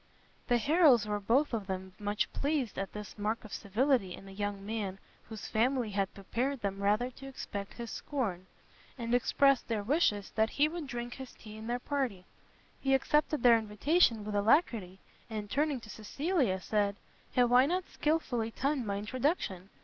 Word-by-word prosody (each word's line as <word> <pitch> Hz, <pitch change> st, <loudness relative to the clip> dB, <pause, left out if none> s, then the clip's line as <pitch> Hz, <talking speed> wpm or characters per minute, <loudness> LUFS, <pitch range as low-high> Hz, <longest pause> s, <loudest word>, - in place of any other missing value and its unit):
The 245 Hz, -, +4 dB
Harrels 280 Hz, -, +5 dB
were 210 Hz, 0 st, -1 dB
both 245 Hz, +8 st, +2 dB
of 210 Hz, -4 st, -2 dB
them 190 Hz, -1 st, -4 dB
much 205 Hz, 0 st, -1 dB
pleased 280 Hz, -8 st, -1 dB
at 195 Hz, -, -3 dB
this 210 Hz, 0 st, -8 dB
mark 215 Hz, +2 st, -1 dB
of 215 Hz, -, -10 dB
civility 220 Hz, -2 st, +1 dB
in 195 Hz, -, -13 dB
a -, -, -10 dB
young 200 Hz, 0 st, -4 dB
man 205 Hz, -3 st, -3 dB, 0.3 s
whose 220 Hz, -2 st, -7 dB
family 240 Hz, 0 st, +1 dB
had 195 Hz, -1 st, 0 dB
prepared 240 Hz, +7 st, -2 dB
them 195 Hz, -1 st, -2 dB
rather 210 Hz, +5 st, +2 dB
to 270 Hz, +2 st, -11 dB
expect 200 Hz, -6 st, -6 dB
his 235 Hz, -2 st, -6 dB
scorn, 200 Hz, -11 st, -3 dB, 0.5 s
and 235 Hz, -1 st, -3 dB
expressed 275 Hz, +2 st, +3 dB
their 220 Hz, -3 st, -1 dB
wishes 215 Hz, -, +1 dB
that 220 Hz, 0 st, +2 dB
he 290 Hz, +5 st, +3 dB
would 325 Hz, -2 st, -5 dB
drink 240 Hz, -2 st, -4 dB
his 265 Hz, -2 st, -9 dB
tea 215 Hz, -1 st, -12 dB
in 220 Hz, +1 st, -8 dB
their 240 Hz, +1 st, 0 dB
party; 245 Hz, -8 st, -2 dB, 0.5 s
he 270 Hz, 0 st, +3 dB
accepted 300 Hz, 0 st, +1 dB
their 235 Hz, -2 st, +7 dB
invitation 225 Hz, -, +2 dB
with 210 Hz, -, -4 dB
alacrity, 205 Hz, -, +2 dB, 0.3 s
and 210 Hz, -2 st, -5 dB
turning 290 Hz, -1 st, +1 dB
to 215 Hz, -, -12 dB
Cecilia, 260 Hz, -, 0 dB
said, 205 Hz, 0 st, 0 dB, 0.4 s
"Have 245 Hz, -1 st, +4 dB
I 255 Hz, +2 st, +7 dB
not 365 Hz, +3 st, 0 dB
skilfully 280 Hz, -7 st, 0 dB
timed 270 Hz, 0 st, -1 dB
my 200 Hz, 0 st, -1 dB
introduction! 210 Hz, -, -1 dB
230 Hz, 175 wpm, -32 LUFS, 205-270 Hz, 0.5 s, their